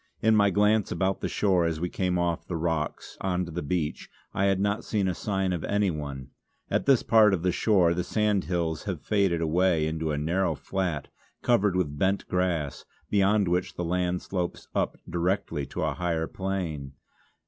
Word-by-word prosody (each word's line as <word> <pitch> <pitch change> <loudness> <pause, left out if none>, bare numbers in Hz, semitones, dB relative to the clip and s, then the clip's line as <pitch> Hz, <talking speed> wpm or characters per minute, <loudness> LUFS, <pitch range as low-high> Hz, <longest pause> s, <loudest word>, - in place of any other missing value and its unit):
In 110 0 +4
my 100 -1 +5
glance 105 +1 +2
about 95 0 0
the - - -1
shore, 95 -4 +2
as 80 -2 -1
we 90 - -1
came 90 0 -1
off 85 -1 -1
the 90 - -3
rocks 80 -2 -2
on 90 -1 0
to 85 - -8
the 85 +2 -3
beach, 75 0 -2 0.2
I 95 - +1
had 95 -1 +2
not 100 +1 0
seen 100 -3 0
a 90 - +1
sign 95 -1 -1
of 85 - -3
anyone. 75 -10 -2 0.4
At - - 0
this 135 -4 +5
part 110 -3 +5
of 85 - -6
the 90 - +2
shore 90 -4 +3
the 90 +1 -1
sandhills 90 -7 0
have 95 -7 -4
faded 95 -5 +1
away 85 0 +2
into 80 0 -2
a 75 - -1
narrow 85 +6 0
flat 90 -7 -3 0.3
covered 105 -6 +3
with 75 -6 -1
bent 95 +1 +1
grass, 90 -6 -1 0.3
beyond 100 0 +3
which 90 +1 0
the 85 - -3
land 90 +1 0
slopes 90 -3 -3
up - - 0
directly 85 -4 -1
to - - -5
the - - 0
higher 85 -2 -1
plain. 85 -8 -4
90 Hz, 185 wpm, -27 LUFS, 85-95 Hz, 0.4 s, my